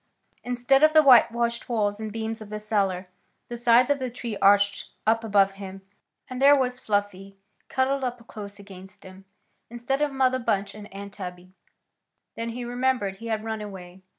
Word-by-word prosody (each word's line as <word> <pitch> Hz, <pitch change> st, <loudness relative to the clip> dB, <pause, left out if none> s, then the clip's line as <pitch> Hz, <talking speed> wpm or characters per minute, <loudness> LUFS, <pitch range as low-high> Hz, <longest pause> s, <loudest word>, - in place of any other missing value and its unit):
Instead 245 Hz, +2 st, +2 dB
of 310 Hz, 0 st, +5 dB
the 310 Hz, -1 st, +7 dB
white 250 Hz, -4 st, +7 dB
washed 235 Hz, 0 st, -2 dB
walls 210 Hz, -3 st, 0 dB
and 220 Hz, -1 st, -5 dB
beams 225 Hz, +1 st, -4 dB
of 215 Hz, -, -10 dB
the 210 Hz, -, -4 dB
cellar, 200 Hz, -4 st, -1 dB, 0.4 s
the 240 Hz, -, -5 dB
sides 240 Hz, +1 st, +4 dB
of 285 Hz, -, +1 dB
the 255 Hz, -1 st, -3 dB
tree 235 Hz, -2 st, -6 dB
arched 200 Hz, 0 st, +3 dB, 0.2 s
up 225 Hz, +1 st, +2 dB
above 200 Hz, -3 st, +3 dB
him; 195 Hz, -1 st, -10 dB, 0.4 s
and 255 Hz, 0 st, -6 dB
there 285 Hz, +1 st, +7 dB
was 250 Hz, -2 st, -1 dB
Fluffy 200 Hz, -2 st, -3 dB, 0.3 s
cuddled 265 Hz, +1 st, 0 dB
up 245 Hz, -2 st, -4 dB
close 205 Hz, -3 st, -9 dB
against 195 Hz, 0 st, -13 dB
him, 190 Hz, 0 st, -14 dB, 0.4 s
instead 240 Hz, +4 st, -3 dB
of 295 Hz, -1 st, +1 dB
Mother 260 Hz, -1 st, +1 dB
Bunch 200 Hz, -4 st, -1 dB
and 210 Hz, -1 st, -11 dB
Aunt 200 Hz, 0 st, -9 dB
Tabby. 180 Hz, -1 st, -9 dB, 0.8 s
Then 230 Hz, 0 st, -4 dB
he 240 Hz, +1 st, -5 dB
remembered. 245 Hz, -5 st, -1 dB
He 230 Hz, -, -9 dB
had 220 Hz, -1 st, -2 dB
run 220 Hz, -1 st, -4 dB
away. 190 Hz, -3 st, -10 dB
220 Hz, 180 wpm, -25 LUFS, 200-245 Hz, 0.8 s, the